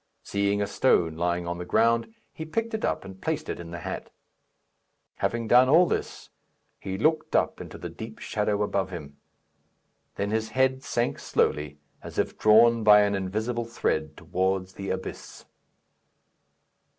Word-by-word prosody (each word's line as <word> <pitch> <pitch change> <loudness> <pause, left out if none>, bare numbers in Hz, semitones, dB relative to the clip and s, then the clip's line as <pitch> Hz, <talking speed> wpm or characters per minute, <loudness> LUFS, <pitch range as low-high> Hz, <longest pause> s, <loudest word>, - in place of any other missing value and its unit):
Seeing 100 0 0
a - - 0
stone 90 -6 +2
lying 85 +1 -1
on 85 0 -3
the - - -4
ground, 115 - +2 0.2
he 160 - -6
picked 225 +9 -3
it 220 - -3
up - - -1
and 95 -1 -11
placed 160 -1 -2
it - - -4
in 85 -1 -8
the 85 -1 -7
hat. - - -5 1.1
Having 115 -1 -1
done 125 +2 +6
all 165 +5 +7
this, - - -4 0.5
he 95 0 -4
looked 155 +7 +1
up - - +1
into - - -9
the - - -6
deep 110 0 -9
shadow 105 -1 -1
above 100 -2 -1
him. 75 -6 -8 1.0
Then 100 +1 -2
his 110 0 -1
head 130 0 +3
sank 120 -2 -1
slowly, 75 -1 0 0.2
as - - -10
if - - 0
drawn 115 +1 +5
by 105 -1 +8
an 100 0 +2
invisible 110 +5 -2
thread 80 -9 -2
towards 95 +2 -1
the 95 0 -6
abyss. 95 0 -6
105 Hz, 160 wpm, -26 LUFS, 95-120 Hz, 1.1 s, by